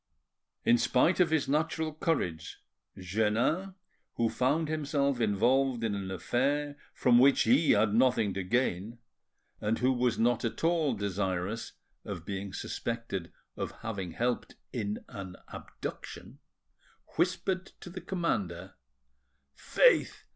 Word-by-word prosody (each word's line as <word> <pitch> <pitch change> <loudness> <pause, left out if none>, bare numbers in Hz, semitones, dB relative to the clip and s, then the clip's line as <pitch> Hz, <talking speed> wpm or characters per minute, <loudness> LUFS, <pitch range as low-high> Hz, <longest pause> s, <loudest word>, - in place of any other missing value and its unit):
In 120 - +5
spite 125 +10 +3
of 180 -3 +4
his 160 -2 +1
natural 160 +2 0
courage, 120 - -2 0.4
Jeannin, 110 - 0 0.4
who 115 -1 +1
found 140 +7 +1
himself 140 -4 0
involved 120 +4 +2
in 110 -2 0
an 100 -1 -4
affair 140 - -1 0.2
from 120 -1 +4
which 135 +2 +5
he 135 +8 +4
had 105 0 +3
nothing 115 -4 +3
to 95 - -2
gain, 110 +1 -1 0.6
and 110 +2 0
who 130 +1 +2
was 125 -2 +1
not 120 0 +2
at 115 +3 -3
all 165 -3 +2
desirous 100 +1 -2 0.3
of 90 -5 -6
being 100 0 -4
suspected 115 -3 -4 0.2
of - - -4
having 95 -6 -4
helped 120 +4 -2 0.2
in 105 -4 -3
an 95 -2 -8
abduction, - - -8 0.8
whispered 185 +1 0
to 175 - -9
the 185 +1 -7
commander— 95 - -2 0.8
"Faith! - - +3
120 Hz, 125 wpm, -30 LUFS, 100-145 Hz, 0.8 s, In